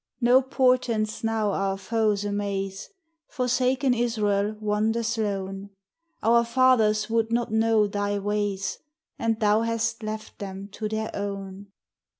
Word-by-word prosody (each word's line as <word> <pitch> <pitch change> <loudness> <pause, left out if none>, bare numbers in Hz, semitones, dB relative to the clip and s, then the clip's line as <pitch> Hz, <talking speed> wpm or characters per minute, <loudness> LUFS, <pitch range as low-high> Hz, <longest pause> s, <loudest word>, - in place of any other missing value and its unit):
No 250 +1 +5
portents 250 -5 +1
now 220 -2 +1
our 195 0 -1
foes 210 0 0
amaze, 200 -1 -3 0.4
Forsaken 255 +1 +1
Israel 215 -3 0
wanders 220 +2 0
lone: 195 -2 -3 0.5
Our 235 +1 +5
fathers 230 -3 +3
would 225 0 0
not 235 -1 0
know 220 -1 +3
Thy 205 0 -1
ways, 205 -1 -2 0.4
And 225 -1 0
Thou 210 0 +3
hast 230 0 -1
left 215 0 -6
them 195 0 -7
to 215 +1 -5
their 220 0 -3
own. 200 -1 -5
215 Hz, 125 wpm, -25 LUFS, 205-230 Hz, 0.5 s, No